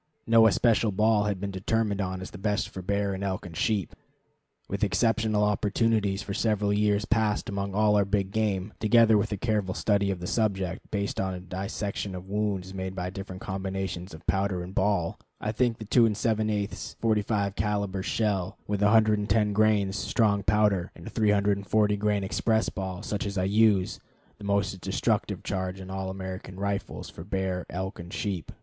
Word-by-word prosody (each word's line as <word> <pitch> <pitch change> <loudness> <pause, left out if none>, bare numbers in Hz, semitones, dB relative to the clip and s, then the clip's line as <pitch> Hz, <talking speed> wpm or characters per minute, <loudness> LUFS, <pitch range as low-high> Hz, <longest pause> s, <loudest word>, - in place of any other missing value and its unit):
No 115 0 +6
especial 110 0 +3
ball 105 +1 +3
has 105 -1 0
been 100 +1 -4
determined 100 +2 0
on 95 -1 -3
as 95 - -7
best 105 +1 -1
for 95 - -7
bear 100 +1 0
and 95 +1 -4
elk 95 -2 -2
and 85 -2 -9
sheep. 100 +1 0 0.7
With 100 +1 -2
exceptional 110 +2 +2
opportunities 105 0 +1
for 100 - -5
several 105 -1 +1
years 105 0 +2
past 110 -2 +1
among 100 -1 -3
all 105 0 +4
our 100 - +4
big 100 -1 -1
game, 105 -2 -1
together 115 0 +5
with 105 - +1
a 105 - -1
careful 105 -4 -1
study 100 -2 +1
of 95 -2 -2
the 90 - -6
subject, 95 -3 -1
based 100 -1 -2
on 95 -1 -2
a - - -6
dissection 95 +2 -4
of 90 +1 -8
wounds 100 -2 -2
made 95 0 -4
by 90 0 -3
different 95 -1 -7
combinations 95 -1 -4
of 80 - -14
powder 95 0 0
and 90 +2 -8
ball, 95 -4 +1 0.2
I 105 - -2
think 120 0 +1
the 110 - -8
2 115 +3 +5
7/8 110 -1 -1
45 105 -2 +1
caliber 100 -1 -1
shell, 95 -3 -1
with 105 -1 -2
110 105 0 +3
grains 105 -2 +2
strong 100 -2 +2
powder 100 -2 +2
and 85 - -12
a - - -7
340 105 0 +2
grain 105 -1 +1
express 110 +3 +1
ball 95 0 -5
such 105 -1 -2
as 100 0 -4
I 90 - +1
use, 100 -1 +3 0.4
the 105 - -8
most 100 -2 0
destructive - - -1
charge 95 -1 -3
in 95 0 -8
all 95 0 -3
American 95 0 -6
rifles 100 0 -3
for 80 - -9
bear, 95 -1 -2
elk, 95 +2 -4
and 85 0 -8
sheep. 100 -7 -3
100 Hz, 180 wpm, -27 LUFS, 95-105 Hz, 0.7 s, No